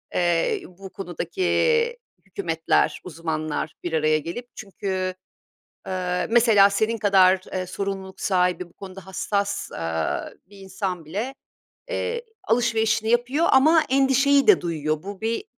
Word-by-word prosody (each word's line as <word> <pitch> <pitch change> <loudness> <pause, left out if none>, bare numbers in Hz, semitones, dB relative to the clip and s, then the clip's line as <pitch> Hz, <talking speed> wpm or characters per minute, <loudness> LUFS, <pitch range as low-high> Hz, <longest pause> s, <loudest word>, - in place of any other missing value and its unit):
eee, 175 -2 +1
bu 190 +2 -12
konudaki 465 - 0 0.3
hükümetler, 170 -4 0
uzmanlar 155 -3 -4
bir 175 -2 -4
araya 155 0 +3
gelip 205 +11 -6
çünkü, 190 -2 -4 0.7
eee, 180 -1 -2
mesela 220 -4 +6
senin 220 +3 0
kadar, 190 -3 +5
eee, 185 -1 -2
sorumluluk 195 0 -5
sahibi 180 -2 +1
bu - - -25
konuda 190 -1 -11
hassas, 200 +1 -2
aaa, 80 -1 -2 0.2
bir 200 +1 -16
insan 190 -3 -4
bile, 210 - -4 0.5
eee, 475 -1 -3 0.2
alışverişini 225 -1 +1
yapıyor 250 +8 +2
ama 310 +4 +5
endişeyi 275 +1 +4
de 415 - +6
duyuyor. 155 -2 -2
Bu 200 +1 -8
bir 225 +1 -2
195 Hz, 125 wpm, -24 LUFS, 180-235 Hz, 0.7 s, mesela